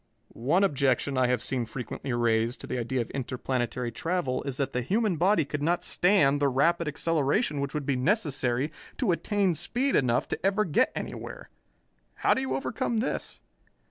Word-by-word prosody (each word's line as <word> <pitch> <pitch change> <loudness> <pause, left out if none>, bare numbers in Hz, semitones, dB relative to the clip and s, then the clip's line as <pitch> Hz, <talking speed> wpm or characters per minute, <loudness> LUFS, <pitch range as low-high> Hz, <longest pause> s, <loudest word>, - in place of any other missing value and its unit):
"One 150 - +2
objection 140 -5 +1
I 130 -1 +3
have 125 -2 0
seen 125 -3 -1
frequently 125 +3 -5
raised 120 0 +1
to - - -7
the 125 - -3
idea 120 +2 -1
of 115 - -6
interplanetary 125 -2 -2
travel 150 0 -1
is 135 -2 -3
that 140 - -1
the 125 - 0
human 205 - +1
body 180 -1 +3
could 145 +1 -4
not 170 +4 +1
stand 175 -7 +3
the 145 - +3
rapid 165 +6 +2
acceleration 150 - 0
which 140 +1 -3
would 150 -2 -2
be 140 - +1
necessary 140 - 0 0.3
to 240 -8 +1
attain 195 +1 +1
speed 245 - -1
enough 125 -3 +2
to - - -4
ever 200 +2 +2
get 155 - +2
anywhere. - - -7 0.6
How - - +3
do - - -1
you 130 0 -1
overcome 135 - -2
this?" 225 - -2
140 Hz, 175 wpm, -28 LUFS, 125-175 Hz, 0.6 s, I